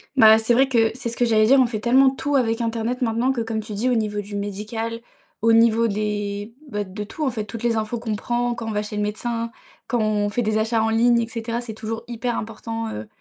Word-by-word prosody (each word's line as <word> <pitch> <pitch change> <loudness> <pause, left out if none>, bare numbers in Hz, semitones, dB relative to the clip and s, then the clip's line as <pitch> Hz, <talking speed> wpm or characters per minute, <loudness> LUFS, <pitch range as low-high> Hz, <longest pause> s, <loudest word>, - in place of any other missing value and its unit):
Bah, 220 -4 +8
c'est 225 +2 +2
vrai 265 +3 +4
que 230 -4 +3
c'est 235 0 -4
ce 230 - -7
que 245 - +3
j'allais 215 -2 +4
dire: 270 +3 +6
«On 260 - +6
fait 230 -3 -3
tellement 260 +4 +5
tout 285 +2 -2
avec 235 -3 +1
internet 230 +2 -2
maintenant», 235 +2 +1
que 250 -3 -1
comme 225 -1 -2
tu 215 0 -7
dis: 225 +5 0
«Au 250 - +2
niveau 210 -2 -1
du 205 0 -8
médical, 215 +3 -4 0.4
au 230 +1 +4
niveau 230 0 +5
des 205 0 -3 0.2
bah, 210 -3 -2
de 200 +2 -6
tout 300 +9 -4
en 265 - +1
fait», 220 -3 -4
toutes 230 +2 -8
les 235 -1 +1
infos 220 +2 -2
qu'on 225 -2 -2
prend, 240 +3 -1
quand 235 -1 -6
on - - -2
va 210 0 -1
chez 210 0 -7
le 210 - -1
médecin, 230 +2 -2 0.4
quand 240 - 0
on 210 -1 +1
fait 240 +4 -1
des 215 0 +1
achats 220 0 +1
en 225 - +1
ligne 235 +1 +4
et 230 - -1
cetera, 230 +1 -3
c'est 230 -2 -6
toujours 225 +1 -5
hyper 240 0 -2
important, 225 +1 -5
heu, 105 0 -6
225 Hz, 260 wpm, -23 LUFS, 215-240 Hz, 0.4 s, Bah